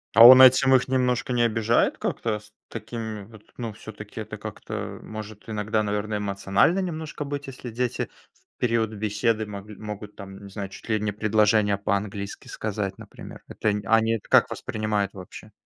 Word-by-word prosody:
А 115 Hz, +1 st, +10 dB
он 130 Hz, +1 st, +11 dB
этим 130 Hz, +1 st, +7 dB
их 130 Hz, -, +2 dB
немножко 125 Hz, -1 st, 0 dB
не 120 Hz, -1 st, +2 dB
обижает? 115 Hz, 0 st, +2 dB
Как-то 110 Hz, -2 st, -2 dB
с 105 Hz, 0 st, -19 dB, 0.2 s
такими 110 Hz, -2 st, -6 dB
вот, 110 Hz, -1 st, -15 dB, 0.2 s
ну, 115 Hz, -3 st, -4 dB
всё-таки -, -, -9 dB
это -, -, -7 dB
как-то, -, -, -6 dB
может 110 Hz, -1 st, -9 dB
иногда, 110 Hz, 0 st, 0 dB
наверно, 105 Hz, +1 st, -2 dB
эмоционально 100 Hz, -, +2 dB
немножко 160 Hz, -5 st, -4 dB
быть? 145 Hz, 0 st, -5 dB
Если 125 Hz, -2 st, -8 dB
дети 125 Hz, +1 st, -2 dB, 0.2 s
в -, -, -37 dB
период 115 Hz, -3 st, +1 dB
беседы 110 Hz, +1 st, 0 dB
могли 105 Hz, 0 st, -9 dB
могут, 105 Hz, 0 st, -8 dB
там, 100 Hz, 0 st, -10 dB
не -, -, -10 dB
знаю, 100 Hz, -1 st, -6 dB
чуть -, -, -12 dB
ли 110 Hz, -1 st, +2 dB
не 105 Hz, 0 st, -1 dB
предложения 105 Hz, -1 st, +2 dB
по-английски 100 Hz, 0 st, -3 dB
сказать, 105 Hz, -2 st, -4 dB
например. -, -, -11 dB
Это 110 Hz, -, -1 dB, 0.2 s
они 115 Hz, +1 st, +3 dB
это 115 Hz, -, -4 dB
как -, -, +6 dB
это -, -, -6 dB
воспринимают 105 Hz, -2 st, -2 dB
вообще? 100 Hz, +3 st, -11 dB
110 Hz, 175 wpm, -25 LUFS, 105-115 Hz, 0.2 s, он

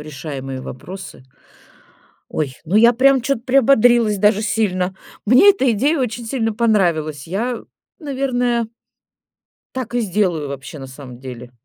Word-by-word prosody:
решаемые 135 Hz, -3 st, -6 dB
вопросы. 180 Hz, +2 st, -9 dB, 1.0 s
Ой, 140 Hz, -4 st, -3 dB
ну 175 Hz, +5 st, 0 dB
я 235 Hz, +2 st, +7 dB
прям 265 Hz, +1 st, +4 dB
чё-то 275 Hz, -2 st, -1 dB
приободрилась 240 Hz, -4 st, +4 dB
даже 210 Hz, +1 st, +3 dB
сильно. 190 Hz, -4 st, 0 dB, 0.3 s
Мне 255 Hz, -, +7 dB
эта 270 Hz, -11 st, +1 dB
идея 285 Hz, +9 st, +1 dB
очень 240 Hz, -2 st, -3 dB
сильно 225 Hz, -2 st, -1 dB
понравилась. 175 Hz, -, 0 dB
Я, 225 Hz, +7 st, -3 dB, 0.4 s
наверное 250 Hz, -6 st, -1 dB, 1.1 s
так 245 Hz, -2 st, -5 dB
и 245 Hz, -, +2 dB
сделаю 180 Hz, -8 st, 0 dB
вообще, 140 Hz, +2 st, -8 dB
на 135 Hz, -, -8 dB
самом 130 Hz, -2 st, -11 dB
деле. 125 Hz, -2 st, -9 dB
215 Hz, 130 wpm, -19 LUFS, 155-245 Hz, 1.1 s, я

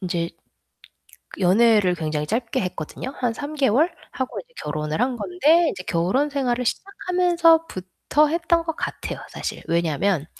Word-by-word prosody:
인제 175 Hz, -3 st, -2 dB, 1.1 s
연애를 200 Hz, 0 st, +4 dB
굉장히 155 Hz, -2 st, -2 dB
짧게 230 Hz, +1 st, -1 dB
했거든요. 180 Hz, -, -5 dB
한 245 Hz, -3 st, 0 dB
3개월 285 Hz, -, +1 dB, 0.2 s
하고 260 Hz, -1 st, -4 dB
이제 -, -, -13 dB
결혼을 155 Hz, +3 st, -2 dB
한 250 Hz, 0 st, +1 dB
건데 335 Hz, +5 st, +3 dB
인제 185 Hz, -7 st, -6 dB
결혼 185 Hz, +13 st, +1 dB
생활을 255 Hz, -3 st, -1 dB
시작하면서부터 330 Hz, -, +1 dB
했던 335 Hz, +1 st, +1 dB
것 325 Hz, -1 st, -3 dB
같아요 -, -, -4 dB
사실. -, -, -5 dB
왜냐하면 170 Hz, 0 st, +1 dB
245 Hz, 305 characters per minute, -23 LUFS, -, 1.1 s, 연애를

